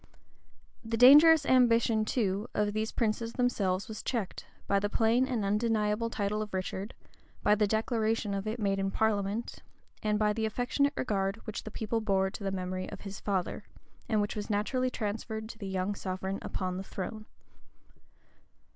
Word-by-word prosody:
The 225 Hz, 0 st, -2 dB
dangerous 295 Hz, +5 st, +8 dB
ambition, 230 Hz, -4 st, +4 dB
too, 210 Hz, -2 st, -1 dB
of 205 Hz, 0 st, +1 dB
these 215 Hz, +1 st, -1 dB
princes 230 Hz, 0 st, -1 dB
themselves 200 Hz, -7 st, 0 dB
was 220 Hz, -, -6 dB
checked, 225 Hz, -7 st, -3 dB, 0.2 s
by 200 Hz, -, +2 dB
the 205 Hz, +1 st, -1 dB
plain 230 Hz, +4 st, +2 dB
and 235 Hz, -6 st, -1 dB
undeniable 210 Hz, +1 st, +1 dB
title 210 Hz, -1 st, -1 dB
of 210 Hz, -2 st, -5 dB
Richard, 190 Hz, +3 st, -4 dB, 0.5 s
by 210 Hz, -, +5 dB
the 210 Hz, 0 st, +2 dB
declaration 220 Hz, -1 st, 0 dB
of 200 Hz, +1 st, -3 dB
it 220 Hz, +3 st, -3 dB
made 195 Hz, -2 st, 0 dB
in 195 Hz, 0 st, 0 dB
parliament, 210 Hz, +1 st, -1 dB, 0.4 s
and 210 Hz, -1 st, +1 dB
by 210 Hz, 0 st, +2 dB
the 220 Hz, 0 st, -1 dB
affectionate 250 Hz, +6 st, 0 dB
regard 195 Hz, -4 st, 0 dB
which 215 Hz, -, -5 dB
the -, -, -5 dB
people 225 Hz, +1 st, -2 dB
bore 190 Hz, -3 st, +1 dB
to 200 Hz, -, -8 dB
the 195 Hz, -, 0 dB
memory 185 Hz, -1 st, -3 dB
of 200 Hz, -, -9 dB
his 195 Hz, -1 st, -7 dB
father, 190 Hz, -3 st, -2 dB, 0.5 s
and 215 Hz, -2 st, +2 dB
which 205 Hz, -, -2 dB
was 210 Hz, 0 st, -5 dB
naturally 255 Hz, +5 st, 0 dB
transferred 220 Hz, -1 st, -4 dB
to 225 Hz, -, -10 dB
the 200 Hz, -, -5 dB
young 190 Hz, +1 st, -1 dB
sovereign 190 Hz, 0 st, -4 dB
upon 185 Hz, -1 st, -3 dB
the 190 Hz, -, -4 dB
throne. 215 Hz, +3 st, -6 dB
215 Hz, 170 wpm, -30 LUFS, 195-230 Hz, 0.5 s, dangerous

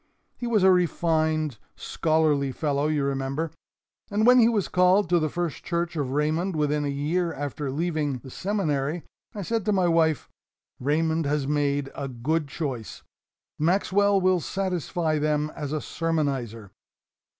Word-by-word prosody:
He 240 Hz, -, -5 dB
was 215 Hz, -5 st, +2 dB
a 190 Hz, -, +7 dB
refined, 160 Hz, -, +1 dB, 0.2 s
scholarly 155 Hz, -4 st, +1 dB
fellow, 145 Hz, +1 st, 0 dB
you 150 Hz, -2 st, 0 dB
remember, 135 Hz, +3 st, -2 dB, 0.6 s
and 210 Hz, +2 st, +1 dB
when 250 Hz, +1 st, +7 dB
he 230 Hz, -1 st, +6 dB
was 210 Hz, -5 st, 0 dB
called 180 Hz, +2 st, +3 dB
to 175 Hz, -1 st, +4 dB
the 155 Hz, -1 st, 0 dB
First 170 Hz, -1 st, -3 dB
Church 170 Hz, 0 st, -2 dB
of 145 Hz, -5 st, -1 dB
Raymond 155 Hz, +6 st, 0 dB
within 150 Hz, -1 st, +1 dB
a -, -, -1 dB
year 155 Hz, +5 st, -1 dB
after 145 Hz, -1 st, -4 dB
leaving 150 Hz, -2 st, -1 dB
the 130 Hz, +2 st, -12 dB
Seminary, 165 Hz, -6 st, -1 dB, 0.3 s
I 205 Hz, -, -4 dB
said 225 Hz, +3 st, -1 dB
to 210 Hz, -, +2 dB
my 185 Hz, -3 st, +2 dB
wife, 160 Hz, -3 st, +2 dB, 0.5 s
'Raymond 160 Hz, +3 st, +1 dB
has 145 Hz, -1 st, 0 dB
made 145 Hz, -1 st, 0 dB
a 140 Hz, -, -4 dB
good 140 Hz, +5 st, -1 dB
choice. 130 Hz, -6 st, -5 dB, 0.6 s
Maxwell 195 Hz, +4 st, +3 dB
will 185 Hz, -1 st, +3 dB
satisfy 175 Hz, -3 st, -1 dB
them 150 Hz, 0 st, 0 dB
as 145 Hz, -3 st, -5 dB
a 155 Hz, -, -1 dB
sermonizer.' 135 Hz, -, -2 dB
155 Hz, 150 wpm, -26 LUFS, 145-175 Hz, 0.6 s, a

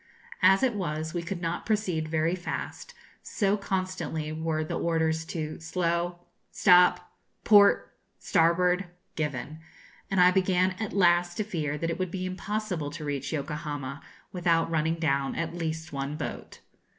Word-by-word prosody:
As 195 Hz, +4 st, +5 dB
it 255 Hz, -3 st, +3 dB
was, 160 Hz, -5 st, -3 dB
we 175 Hz, -, -1 dB
could 175 Hz, +1 st, -5 dB
not 165 Hz, +1 st, -2 dB
proceed 185 Hz, -8 st, -1 dB
very 160 Hz, +1 st, +1 dB
fast, 185 Hz, -, -5 dB, 0.3 s
so 200 Hz, -1 st, 0 dB
constantly 185 Hz, -6 st, -3 dB
were 155 Hz, 0 st, -1 dB
the 155 Hz, -, -5 dB
orders 160 Hz, -1 st, 0 dB
to 155 Hz, -2 st, -5 dB
'slow,' 170 Hz, +1 st, -1 dB, 0.3 s
'stop,' 180 Hz, 0 st, +4 dB, 0.3 s
'port,' 205 Hz, -2 st, +5 dB, 0.2 s
'starboard,' 180 Hz, +3 st, +2 dB, 0.3 s
given; 150 Hz, 0 st, -3 dB, 0.5 s
and 195 Hz, -, +1 dB
I 180 Hz, 0 st, +7 dB
began 185 Hz, 0 st, +2 dB
at 220 Hz, -2 st, -3 dB
last 175 Hz, -2 st, +3 dB
to 215 Hz, -, 0 dB
fear 155 Hz, -8 st, -3 dB
that 165 Hz, +2 st, -2 dB
it 165 Hz, -, -4 dB
would 185 Hz, -1 st, -1 dB
be 185 Hz, +1 st, -4 dB
impossible 185 Hz, -4 st, -3 dB
to 155 Hz, 0 st, -7 dB
reach 140 Hz, -2 st, -3 dB
Yokohama 145 Hz, -2 st, -4 dB, 0.3 s
without 170 Hz, -2 st, +1 dB
running 160 Hz, 0 st, +1 dB
down 140 Hz, -4 st, 0 dB
at 165 Hz, 0 st, -3 dB
least 160 Hz, -1 st, -4 dB
one 140 Hz, +1 st, -3 dB
boat. -, -, -6 dB
170 Hz, 150 wpm, -28 LUFS, 155-185 Hz, 0.5 s, I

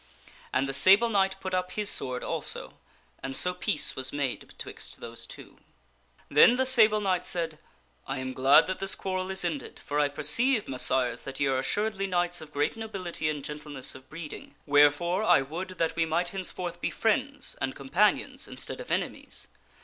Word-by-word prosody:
And 135 Hz, -, +1 dB
the 135 Hz, -, -3 dB
Sable 195 Hz, -, +6 dB
Knight 195 Hz, -3 st, +2 dB
put 185 Hz, -1 st, -5 dB
up 180 Hz, 0 st, -1 dB
his 210 Hz, 0 st, -2 dB
sword 125 Hz, -9 st, 0 dB
also, -, -, -2 dB, 0.5 s
and 135 Hz, 0 st, -5 dB
so 180 Hz, +5 st, +2 dB
peace 180 Hz, -4 st, 0 dB
was 130 Hz, 0 st, -2 dB
made 140 Hz, -3 st, -3 dB
betwixt -, -, -9 dB
those -, -, -9 dB
two. -, -, -13 dB, 0.7 s
Then 150 Hz, +11 st, +6 dB
the 260 Hz, +1 st, +1 dB
Sable 220 Hz, -5 st, +5 dB
Knight 185 Hz, -3 st, 0 dB
said, 165 Hz, -3 st, -2 dB, 0.2 s
" 60 Hz, 0 st, -38 dB
I 135 Hz, -, -3 dB
am 130 Hz, 0 st, -4 dB
glad 135 Hz, +2 st, +6 dB
that 185 Hz, -, -4 dB
this 195 Hz, 0 st, +1 dB
quarrel 185 Hz, -1 st, -3 dB
is 190 Hz, -2 st, 0 dB
ended, 155 Hz, -5 st, -4 dB
for 145 Hz, +1 st, -1 dB
I 145 Hz, -, +3 dB
perceive, 215 Hz, -, +2 dB
Messires, 130 Hz, -2 st, +1 dB
that 135 Hz, -1 st, -6 dB
ye 140 Hz, -, +2 dB
are 135 Hz, -1 st, +1 dB
assuredly 200 Hz, +7 st, -1 dB
knights 175 Hz, -1 st, 0 dB
of 155 Hz, -1 st, -11 dB
great 145 Hz, 0 st, 0 dB
nobility 190 Hz, -8 st, -4 dB
and 145 Hz, -2 st, -4 dB
gentleness 150 Hz, -3 st, -3 dB
of 130 Hz, 0 st, -14 dB
breeding; 155 Hz, -1 st, -9 dB
wherefore 145 Hz, +6 st, +3 dB
I 135 Hz, -, +5 dB
would 165 Hz, +7 st, -5 dB
that 165 Hz, -, 0 dB
we 165 Hz, -1 st, +1 dB
might 170 Hz, +2 st, 0 dB
henceforth 185 Hz, -2 st, -3 dB
be -, -, 0 dB
friends 265 Hz, +6 st, 0 dB
and 135 Hz, 0 st, -2 dB
companions 160 Hz, +10 st, 0 dB
instead -, -, -6 dB
of -, -, -10 dB
enemies. -, -, -3 dB
170 Hz, 185 wpm, -28 LUFS, 140-195 Hz, 0.7 s, Sable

